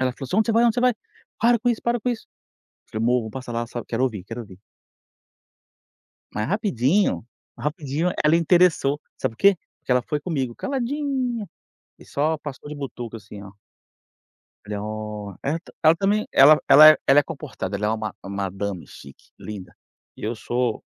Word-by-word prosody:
ela 130 -1 +1
falou 135 - -8
assim: 185 - -2
"Onde 220 - +3
você - - +3
vai? 230 +2 +4
onde 230 -2 +3
você 245 - 0
vai? 250 -2 +3 0.5
para 235 +1 +4
com 245 +3 0
isso, 230 - -2
para 235 0 0
com 250 - -2
isso", 230 - -5 0.6
falei: 110 +1 -2
"Mô 125 0 +3
vamo 110 -1 -6
passar 130 -1 -7
lá 120 0 -2
sabe, 120 0 -7
quero 115 +2 -2
ouvir, 105 -8 -3
quero 115 +3 -6
ouvir." 95 -4 -14 1.7
Mas 105 - -2
rapidinho 190 - +1 0.3
rapidinho 150 +4 -2
ela 155 +2 +5
interessou, 170 -4 +3 0.2
sabe 115 - -2
por - - -28
quê? 200 -3 +5 0.2
Porque 125 - -2
ela 125 - +4
foi 150 +4 -2
comigo 135 -7 -2
caladinha, 265 -4 -2 0.5
e - - -15
só 155 +2 0
passou 145 0 -8
de - - -5
butuca 120 -5 -6
assim 100 0 -11
ó. 100 - -11 1.1
Falei: 105 -1 -4
"Ó!" 105 -1 -6
ela 150 +4 -1
tá 175 - -17
ela 160 +1 +6
também, 205 +3 +1
ela 150 +3 +7
ela 155 +2 +10
é 155 - +5
ela 135 +2 +6
é - - -1
comportada, 135 - -5
ela 105 +1 -1
é - - +1
uma 110 -2 -3
uma 100 0 -7
madame 95 -2 -5
chique, 70 - -15
linda, 100 -4 -8 0.4
e - - -13
eu 110 +3 -2
sou 120 +1 -2
140 Hz, 190 wpm, -23 LUFS, -, 1.7 s, ela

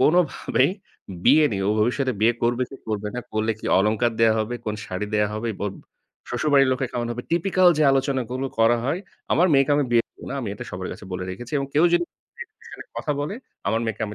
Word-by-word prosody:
কোনভাবেই 170 +4 +3 0.5
বিয়ে 155 0 +6
নিয়ে 95 -1 -1
ও - - +3
ভবিষ্যতে 130 +3 +1
বিয়ে 115 +2 +5
করবে 120 +2 +2
কি 135 - -9
করবে 105 -1 -2
না, 125 - -2
করলে 110 +1 +1
কি - - -7
অলংকার 110 +4 +2
দেয়া 110 -1 +5
হবে, 110 +3 -2
কোন 105 - -1
শাড়ি 95 +3 -3
দেয়া 105 -1 +2
হবে, 115 +2 -3 0.2
ওব 100 - -3 0.6
শ্বশুরবাড়ির 135 +2 +3
লোকে 130 0 -1
কেমন 120 -1 -2
হবে? 125 +1 -6
typical 180 +1 +4
যে - - +4
আলোচনাগুলো 135 -1 -1
করা 115 +1 +5
হয়, 160 +7 -1 0.3
আমার 180 +3 +4
মেয়েকে 135 +1 +4
আমি 145 - +2
বিয়ে 115 -1 +4
দিব - - -24
না। - - -3
আমি 110 - -4
এটা - - -7
সবার 95 0 -5
কাছে - - -11
বলে 90 0 -3
রেখেছি 120 +8 -8
এবং 140 - -2
কেউ 155 +4 +5
যদি 175 0 +3 0.4
এই 475 - -5
বিষয় - - -12
নিয়ে - - -11
কথা 150 - -1
বলে, 150 +8 -3 0.3
আমার 110 +2 +1
মেয়েকে 110 -1 -3
আমি 105 - -7
120 Hz, 220 wpm, -23 LUFS, 110-140 Hz, 0.6 s, বিয়ে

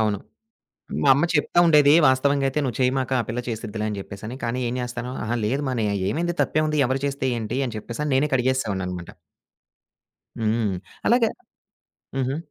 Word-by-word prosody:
అవును. 105 -2 +1 0.8
మా 140 - +3
అమ్మ 145 +5 +2
చెప్తా 150 +3 +1
ఉండేదీ, 150 -3 +6
వాస్తవంగయితే 135 +1 +2
"నువ్వు 125 -4 -2
చెయ్యమాక, 130 0 +1
ఆ - - -2
పిల్ల 115 +2 -2
చేసిద్దిలే" 110 -1 -4
అని 105 - -3
జెప్పేసని. 105 +5 -8
కానీ, 120 +2 -1
ఏం 120 - -3
జేస్తాను, 125 0 -4
అహా! 115 +2 -1
లేదు 135 +7 0
మా - - -1
నే - - +1
ఆహ్, 100 - -1
ఏవైంది 175 +5 -1
తప్పేముంది, 155 0 0
ఎవరు 130 +2 -1
చేస్తే 135 -1 -1
ఏంటి 115 +3 -3
అని 115 - -6
చెప్పేసని 120 +7 -4
నేనే 140 +3 +3
కడిగేసేసేవాడిననమాట. 100 -9 -1 1.3
హ్మ్. 110 -3 0 0.3
అలాగ 235 -1 +4 0.9
హుహు. 135 +1 0
125 Hz, 160 wpm, -24 LUFS, 110-140 Hz, 1.3 s, ఉండేదీ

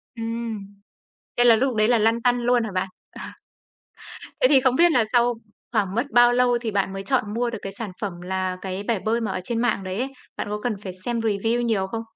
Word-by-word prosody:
Ừm. 230 -1 -4 0.8
Thế 240 - +4
là 235 -2 +7
lúc 260 +2 0
đấy 215 0 +3
là 240 -1 +4
lăn 225 +2 +2
tăn 245 0 +2
luôn 245 0 +2
hả 220 - -4
bạn? 185 +1 -1 0.2
Ờ. - - -10 1.2
Thế - - +6
thì 275 -2 +6
không 255 -1 +2
biết 345 +4 +5
là 245 -7 +4
sau 240 0 +4 0.4
khoảng 205 -4 0
mất 235 - +1
bao 240 0 +6
lâu 245 0 +3
thì 225 -2 -2
bạn 195 -1 0
mới 195 0 -5
chọn 215 -4 0
mua 240 +2 0
được 225 -2 -5
cái 195 - -5
sản 205 -1 -6
phẩm 185 -5 -4
là 185 0 -2
cái 190 +1 -4
bể 220 -1 0
bơi 225 +4 0
mà 225 - -2
ở - - -3
trên 230 +4 -2
mạng 235 -5 0
đấy 185 0 -4
ấy, 265 +2 -2 0.3
bạn - - -3
có 210 0 -3
cần 245 - 0
phải 185 - -5
xem 240 -1 -1
review 225 +2 0
nhiều 220 -5 0
không? 225 +3 -4
225 Hz, 240 wpm, -23 LUFS, 200-240 Hz, 1.2 s, là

